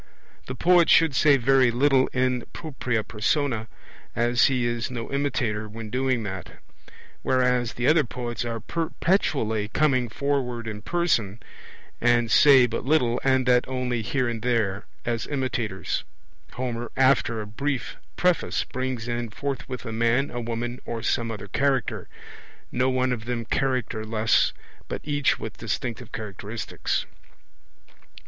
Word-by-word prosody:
The 130 - -4
poet 175 +4 +4
should 165 -3 +5
say 140 +1 +5
very 130 0 +4
little 130 +2 +3
in 125 -1 0
propria 130 -7 -2
persona, 115 +1 -1 0.5
as 120 +1 +3
he 130 -3 +1
is 120 0 -1
no 120 -1 -5
imitator 120 -7 -1
when 110 0 -8
doing 130 -2 0
that. 95 -4 -6 0.7
Whereas 125 -2 +1
the 120 - -2
other 155 +2 +5
poets 120 -2 -4
are 115 -1 -3
perpetually 155 - 0
coming 130 -1 +1
forward 125 -2 -2
in 105 -1 -5
person, 120 - 0 0.6
and 120 -1 +3
say 135 -1 +7
but 115 -1 -3
little, 125 -4 +2
and 130 -1 +3
that 125 -1 +3
only 125 -2 -2
here 130 +3 0
and 115 -2 -3
there, 110 -5 0 0.2
as 115 -1 -2
imitators, 125 -8 -2 0.5
Homer 120 -2 -4
after 130 -4 +3
a 105 - -4
brief 130 +5 -3 0.2
preface 180 -1 +1
brings 130 -2 -4
in 120 -1 -2
forthwith 130 0 -5
a 115 - -4
man, 115 +5 +1
a 120 - -4
woman, 120 +1 -4
or 115 -1 -5
some 120 -2 0
other 105 -3 -6
Character 135 +3 0 0.6
no 125 +1 +1
one 130 0 +1
of 110 -2 -6
them 120 -1 -3
characterless, 115 -4 +1 0.4
but - - -5
each 145 -2 +1
with 110 - -7
distinctive 115 +2 -4
characteristics. 105 0 -4
120 Hz, 140 wpm, -25 LUFS, 115-135 Hz, 0.7 s, say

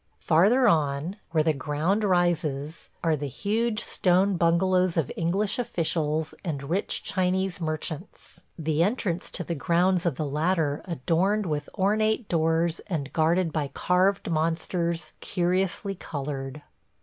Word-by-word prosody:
Farther 205 +11 +4
on, 155 +1 +1
where 160 -2 +2
the 160 0 +2
ground 150 +9 0
rises, 165 -5 0
are 165 -2 +3
the 145 -1 -4
huge 215 - -1
stone 185 +2 +2
bungalows 180 +1 +2
of 155 -6 0
English 195 +7 0
officials 160 -7 -1
and 150 -7 -3
rich 190 +3 -1
Chinese 185 0 0
merchants, 155 +2 -5 0.2
the 160 -1 0
entrance 185 -3 0
to - - -4
the 170 - -3
grounds 175 +3 +2
of 160 - 0
the 155 - -2
latter 150 0 0
adorned 180 +6 0
with 150 -3 -3
ornate 215 +3 +1
doors 165 0 +1
and 150 -8 -3
guarded 165 +1 +2
by 150 -3 -1
carved 185 +2 +2
monsters, 165 +1 -1
curiously 185 +2 0
colored. 145 -4 -5
170 Hz, 130 wpm, -26 LUFS, 155-190 Hz, 0.2 s, Farther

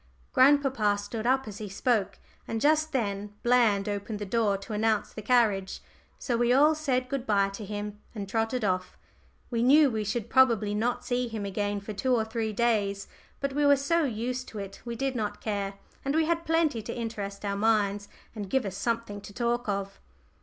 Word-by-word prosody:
'" - - -33
Grandpapa 260 -7 +4
stood 215 +3 -4
up 265 -1 +2
as 205 -1 -7
he 210 -2 -6
spoke, 200 -1 0 0.3
and 225 - -2
just 310 +3 +3
then 205 -5 -2
Bland 230 -5 +3
opened 205 +1 -3
the 205 - -5
door 205 -1 +1
to 200 +3 -8
announce 215 0 0
the 215 - -6
carriage. 210 -4 +2 0.4
So 245 - -2
we 240 +1 +2
all 295 +5 +6
said 265 -5 -1
good 265 -1 -4
bye 200 -2 +3
to 195 +2 -8
him 210 0 -5 0.2
and 200 -2 -4
trotted 225 +3 -1
off. 185 -1 -1 0.5
We 230 -1 0
knew 280 +3 +6
we 220 -1 -1
should 210 +2 -2
probably 230 -6 +4
not 230 +4 -1
see 245 -1 0
him 220 -3 -4
again 205 +1 -2
for 210 +2 -6
two 255 +5 +1
or 220 -2 +1
three 220 -1 -2
days, 205 -3 0 0.3
but 275 -1 -2
we 295 +1 +1
were 285 0 +6
so 330 +5 +1
used 250 0 -2
to 220 - -9
it 195 -1 -7
we 235 -1 -4
did 270 +2 -2
not 215 -3 -3
care; 200 -2 -3 0.3
and 275 +2 -1
we 320 0 +3
had 335 0 -1
plenty 320 -7 +2
to 230 +3 -6
interest 210 -4 -5
our 200 0 -1
minds 205 -1 +1 0.3
and 205 -4 -6
give 265 0 +1
us 190 -1 -4
something 230 -3 -2
to 200 - -11
talk 240 0 -1
of. 195 0 -3
225 Hz, 205 wpm, -28 LUFS, 205-250 Hz, 0.5 s, all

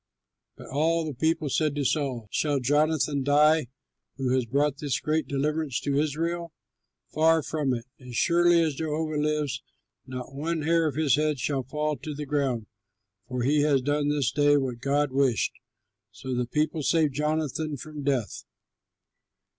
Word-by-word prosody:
But - - -12
all 160 +4 +1
the 155 - -4
people 160 +4 0
said 150 +1 0
to 145 -1 -1
Saul, 130 -7 -1
"Shall 145 -2 +1
Jonathan 145 +2 +1
die 150 +1 +4 0.5
who 130 -2 0
has 130 -2 +1
brought 140 +3 +1
this 145 -4 -1
great 155 +1 -1
deliverance 145 -1 -1
to 140 0 0
Israel? 165 +3 -2 0.6
Far 160 0 +4
from 150 -3 -1
it! 120 -1 -3
As 125 -2 -10
surely 175 -1 +4
as 155 -2 0
Jehovah 155 +1 -2
lives, 150 -3 -1 0.5
not 130 0 -7
one 155 +3 -2
hair 165 +1 +3
of 145 - -3
his 150 -3 +3
head 150 -1 +1
shall 135 +2 -1
fall 150 +3 -2
to 150 -2 -6
the 150 +1 -5
ground, 135 -6 -1 0.6
for 125 -1 -2
he 145 +3 +3
has 145 -3 +2
done 145 +1 +1
this 145 -4 +1
day 145 +1 +4
what 130 -4 -2
God 140 +2 +1
wished." 130 -5 +1 0.6
So 130 - -6
the 125 -1 -1
people 150 +4 0
saved 155 -1 +2
Jonathan 150 0 -1
from 150 +2 -8
death. 135 -6 -1
145 Hz, 160 wpm, -27 LUFS, 135-155 Hz, 0.6 s, die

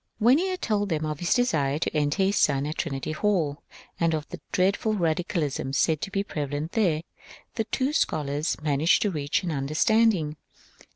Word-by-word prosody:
When 240 +6 +5
he 375 - 0
had 370 -1 -4
told 205 -2 0
them 155 -2 -1
of 150 -1 -3
his 175 - +1
desire 155 - +1
to 160 - -2
enter 150 +5 +1
his 195 +2 +2
son 140 -1 +2
at 155 +2 -4
Trinity 135 -2 -3
Hall, 160 -4 0 0.4
and 165 -1 +2
of 155 0 -4
the 180 - -8
dreadful 200 +4 +1
radicalism 160 -6 -1
said 155 +1 +2
to - - -3
be 195 0 -1
prevalent 145 -2 -4
there, 170 -8 +1 0.5
the 225 - -2
two 265 +5 -1
scholars 150 - 0
managed 150 +2 +3
to 205 - 0
reach 150 +1 -1
an 175 - -2
understanding. 155 +3 +2
160 Hz, 180 wpm, -26 LUFS, 150-205 Hz, 0.5 s, When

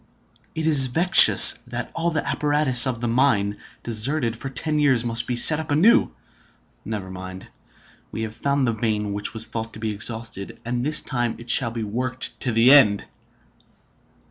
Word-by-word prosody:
It 160 - -4
is 145 -5 +4
vexatious 170 +9 +6
that - - -7
all 165 +1 -2
the 155 -3 -4
apparatus 145 -4 +3
of 125 -3 -4
the 120 - -3
mine, 115 -5 0 0.3
deserted 120 +2 -2
for 135 +4 -8
ten 150 +3 -3
years, 130 -5 +1
must 115 0 -1
be 125 - -3
set 150 +6 +6
up 160 0 -8
anew. 165 +11 +2 0.7
Never 100 -2 -7
mind. 95 0 -11 0.6
We 110 - -6
have 110 -1 -7
found 140 +3 -2
the 115 - -1
vein 105 -2 -3
which 105 +3 -4
was 110 0 +2
thought 115 0 -6
to - - -11
be 110 -1 -4
exhausted, 110 -2 -6
and 120 +1 -4
this 150 +3 0
time 120 -4 -3
it 120 0 -4
shall 125 -3 +3
be 115 -1 -6
worked 125 +4 -5
to 125 - -2
the 115 +3 +3
end!" 110 -8 +4
120 Hz, 175 wpm, -21 LUFS, 110-140 Hz, 0.7 s, vexatious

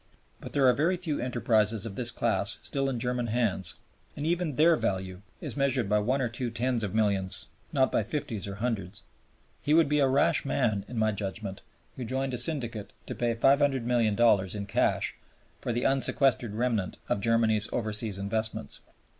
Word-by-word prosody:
But - - -9
there 140 -2 +3
are 125 - +6
very 165 +8 +1
few 165 -5 -3
enterprises 115 -3 +1
of 105 -4 -6
this 120 +1 0
class 115 -4 0
still 135 -1 -1
in 125 -3 -3
German 125 0 -1
hands, 110 -6 0 0.4
and 145 - -3
even 170 -3 0
their 165 +4 +5
value 95 -6 -3 0.2
is - - -4
measured 135 -5 +1
by 105 +1 +2
one 130 +6 0
or - - +1
two 120 +2 -3
tens 120 0 -1
of 100 0 -3
millions, 100 -4 0 0.2
not 130 -2 +2
by - - +2
fifties 115 -2 -3
or 100 - -5
hundreds. 105 -4 -3 0.6
He 150 +1 +2
would 165 -2 +5
be 150 +1 +1
a 140 - +4
rash 135 +2 +2
man, 110 -8 0
in 125 - -7
my 110 0 +2
judgment, 100 -1 -4 0.4
who 130 - -4
joined 130 +2 -2
a 125 - +1
syndicate 120 -10 -1
to - - -5
pay 120 -1 -1
$500,000,000 120 -7 +3
in 100 -1 -4
cash 100 - 0 0.5
for - - -3
the 120 +2 -1
unsequestered 135 -4 +2
remnant 115 -5 -1
of 100 - 0
Germany's 110 -2 +2
overseas 110 -3 -1
investments. 100 -5 -3
115 Hz, 180 wpm, -28 LUFS, 105-135 Hz, 0.6 s, are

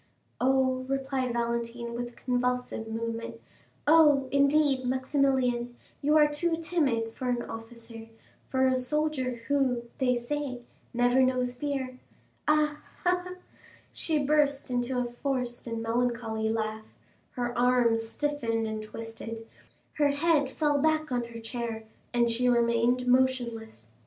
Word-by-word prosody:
"Oh," 260 0 +2
replied 270 -2 -1
Valentine 235 0 -2
with 240 0 -3
a - - -20
convulsive 250 -2 -1
movement, 230 +1 -4 0.5
"oh, 295 -3 +6
indeed, 280 -1 +3
Maximilian, 260 -2 +1 0.3
you 300 +2 +4
are 300 -1 +6
too 325 +3 -1
timid 275 -10 0
for 255 +1 -3
an 240 -1 0
officer, 225 0 -9 0.4
for 265 0 +2
a 260 0 +3
soldier 260 -1 -1
who, 265 -4 +1 0.2
they 250 -2 +3
say, 255 +1 -3 0.3
never 245 +1 +3
knows 255 -1 +1
fear. 260 -1 -3 0.5
Ha, 300 0 +2 0.2
ha, 360 0 +2
ha!" 365 0 -7 0.6
She 305 -3 0
burst 285 -2 +2
into 245 +1 0
a 250 - +1
forced 245 -1 -3
and 230 -1 -3
melancholy 225 -2 0
laugh, 220 -1 -2 0.5
her 240 -1 -2
arms 245 -2 +3
stiffened 235 -6 -1
and 220 0 -3
twisted, 225 +1 -7 0.5
her 290 - +5
head 285 -1 +2
fell 295 -1 +1
back 310 0 +1
on 245 -1 0
her 235 0 -9
chair, 230 -1 -4 0.3
and 235 -1 +2
she 250 +2 +2
remained 235 +1 +2
motionless. 240 - 0
250 Hz, 130 wpm, -28 LUFS, 235-280 Hz, 0.6 s, oh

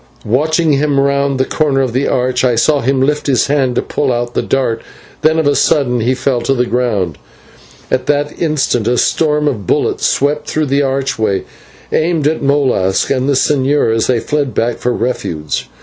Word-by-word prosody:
Watching 150 +4 +1 0.2
round 140 0 +1
the 130 - +2
corner 145 -2 0
of 130 -3 -1
the 130 +3 0
arch, 125 0 0
I 125 -2 +2
saw 145 +5 +2
him 130 +2 0
lift 150 +2 0
his 130 -3 +2
hand 135 -3 0
to - - 0
pull 140 -3 -1
out 120 0 -2
the - - 0
dart, 120 -4 -1 0.4
then 160 +1 +3
of 160 - +1
a 145 0 +2
sudden 125 -5 +2
he 120 +3 +1
fell 130 -1 -1
to 135 +3 0
the 125 -1 +1
ground, 105 - -1 0.7
and 130 - +3
in - - -17
that 145 0 -1
instant 145 -8 0
a 125 +1 +1
storm 150 +1 +1
of 105 -10 -3
bullets - - +1
swept 145 +2 0
through 155 0 0
the 140 0 +1
archway, 135 -7 -1 0.5
aimed 160 -2 0
at 155 +1 -1
Molas 135 -10 +1
and 135 0 0
the - - +3
señor 135 -3 +1
as 115 - 0
they 125 -2 +2
fled 145 -2 -2
back 115 0 0
for 125 - 0
refuge. 80 - -3
135 Hz, 195 wpm, -14 LUFS, 120-145 Hz, 0.7 s, then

